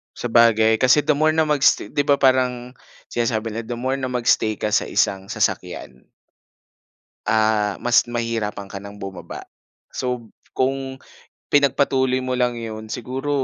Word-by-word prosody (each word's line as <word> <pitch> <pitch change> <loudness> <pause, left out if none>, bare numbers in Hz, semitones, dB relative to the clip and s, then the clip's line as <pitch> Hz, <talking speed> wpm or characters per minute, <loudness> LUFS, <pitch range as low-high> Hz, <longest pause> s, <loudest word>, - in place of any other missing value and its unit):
Sabagay, 115 -2 +3
kasi 135 +3 +4
the 155 - +2
more 155 +2 +2
na 160 - +4
mag-stay 150 -3 +2
di 145 0 -1
ba 140 - +5
parang 125 -2 +1 0.4
sinasabi 115 -1 -1
nila, 110 +1 -6
"The 120 - -3
more 130 +3 -2
na 130 - -2
mag-stay 120 -3 +1
ka 105 +1 -3
sa - - +1
isang 95 0 0
sasakyan” - - -2 1.4
Ah, 110 -1 +2
mas 120 0 +3
mahihirapan 115 -4 -3
ka 100 - -7
ng 100 +1 -10
bumaba. 95 -2 -8 0.4
So, 125 -3 -4 0.2
kung 135 0 -2 0.5
pinagpatuloy 135 -2 +2
mo 130 0 -3
lang 125 -1 0
'yon, 110 -1 -7
siguro 130 +5 -4
120 Hz, 145 wpm, -21 LUFS, 110-130 Hz, 1.4 s, ba